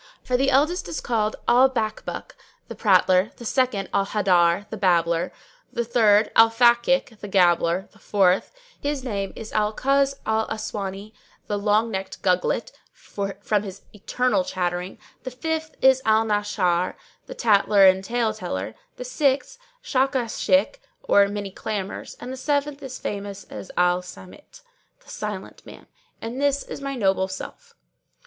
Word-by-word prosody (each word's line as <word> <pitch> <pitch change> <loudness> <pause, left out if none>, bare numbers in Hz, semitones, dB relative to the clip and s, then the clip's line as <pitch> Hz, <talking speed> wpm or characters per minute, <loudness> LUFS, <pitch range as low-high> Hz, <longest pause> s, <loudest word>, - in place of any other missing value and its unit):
For 255 - -1
the 270 +2 +2
eldest 300 - +2
is 170 -2 -4
called 215 -3 -1
Al 255 +2 +6
Bakbúk, 220 -4 -4 0.4
the - - -7
prattler; 185 -1 +3
the 235 - -10
second 230 -5 0
Al 195 - +1
Haddár, 185 -2 +2
the - - -3
babbler; 170 -3 +1 0.4
the 235 -1 -2
third 215 -3 +3
Al 225 0 +7
Fakík, 235 0 +2
the 205 - -7
gabbler; 175 -1 +2
the - - -22
fourth, 190 -2 +2 0.3
his 285 -2 -2
name 200 -6 -3
is 220 - -9
Al 210 0 +1
Kuz 275 0 +2
al 220 0 0
aswáni, 210 -1 -5 0.3
the 205 - -2
long 215 +2 +2
necked 190 -1 -5
Gugglet, 180 -1 0 0.2
from 205 - -3
his 195 -2 -9
eternal 210 0 0
chattering; 180 0 -3 0.2
the 255 - -5
fifth 315 +5 -4
is 265 0 +5
Al 220 0 +3
Nashshár, 205 -4 0 0.3
the - - -8
tattler 205 - +4
and 190 0 +5
tale 230 0 0
teller; 110 - -5 0.2
the 250 - -7
sixth 280 - 0 0.2
Shakáshik, 265 - +1 0.3
or 200 0 +4
many 200 -1 -5
clamours; 200 0 -5
and 250 +1 -7
the - - -7
seventh 285 +1 -1
is 260 -2 -7
famous 200 -1 -5
as - - -8
Al 180 0 +3
Sámit, 240 - -14 0.4
The - - -14
Silent - - -6
Man, - - -13 0.3
and 235 +4 -5
this 280 -1 +1
is - - -8
my 275 0 -4
noble 190 -4 +1
self!" 475 - -9
215 Hz, 150 wpm, -23 LUFS, 190-255 Hz, 0.4 s, Al